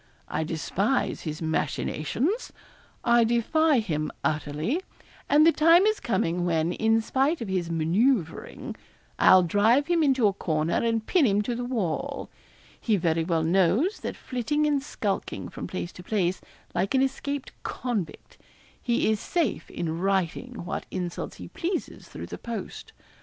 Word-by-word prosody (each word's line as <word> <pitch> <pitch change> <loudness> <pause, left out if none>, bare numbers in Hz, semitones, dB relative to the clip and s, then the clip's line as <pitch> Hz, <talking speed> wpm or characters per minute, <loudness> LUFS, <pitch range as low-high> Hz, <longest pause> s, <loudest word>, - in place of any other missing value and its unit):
I - - -1
despise 190 - -1
his 155 0 -5
machinations. 160 - -1 0.5
I 235 0 +5
defy 265 +7 +3
him 155 -9 -1
utterly; 150 - -1 0.5
and 300 +2 +6
the 330 - +7
time 330 +4 +5
is 430 0 +2
coming 180 -5 0
when, 165 0 +1
in 225 +2 +2
spite 270 +8 +1
of 230 - -4
his 180 -3 -1
manoeuvring, 170 - 0 0.4
I'll 185 -1 +7
drive 215 - +3
him 340 +1 +2
into 265 -6 +3
a 200 - +4
corner 155 -3 -1
and 225 -1 0
pin 340 -8 +3
him 205 0 +2
to 240 - -2
the 245 +1 -3
wall. 255 - -2 0.5
He 220 - +2
very 165 -2 +1
well 165 -1 0
knows 195 - +2
that - - -5
flitting 265 +5 -1
and 290 -2 +2
skulking 210 -7 -3
from - - -6
place 180 -2 -4
to - - -11
place, 185 -2 -1 0.3
like 190 +8 0
an 265 - +4
escaped 270 +1 -3
convict, 225 -10 -4 0.4
he 235 -1 +1
is 215 - 0
safe 330 - -1
in 165 -1 -3
writing 195 +4 -1
what 185 - -4
insults 180 -2 -4
he - - -9
pleases 350 +1 -4
through - - -8
the - - -8
post. 235 -2 -6
220 Hz, 150 wpm, -26 LUFS, 170-270 Hz, 0.5 s, the